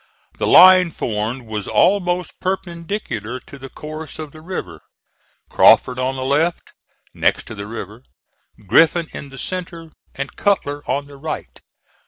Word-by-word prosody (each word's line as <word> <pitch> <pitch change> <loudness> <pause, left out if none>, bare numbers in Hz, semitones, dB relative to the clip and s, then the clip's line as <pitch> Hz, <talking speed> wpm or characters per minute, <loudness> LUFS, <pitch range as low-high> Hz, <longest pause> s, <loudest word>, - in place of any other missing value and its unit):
The - - 0
line 185 -1 +8
formed 115 -2 -3
was 105 -3 -5
almost 180 -3 +1
perpendicular 170 - -4
to 140 - -13
the 135 0 -9
course 155 +1 -8
of 155 -2 -7
the 155 - -13
river 185 +3 -6 0.7
Crawford 125 0 +5
on 130 +1 -1
the 130 - -4
left, 150 +6 0 0.4
next - - +1
to - - -8
the 100 -1 -7
river, 110 0 -8 0.6
Griffin 165 - +4
in 140 - -8
the 135 - -12
centre, 170 0 -6 0.2
and 140 0 -5
Cutler 145 -8 0
on 140 0 -1
the 140 0 -14
right. 155 +2 -6
145 Hz, 145 wpm, -20 LUFS, 130-175 Hz, 0.7 s, line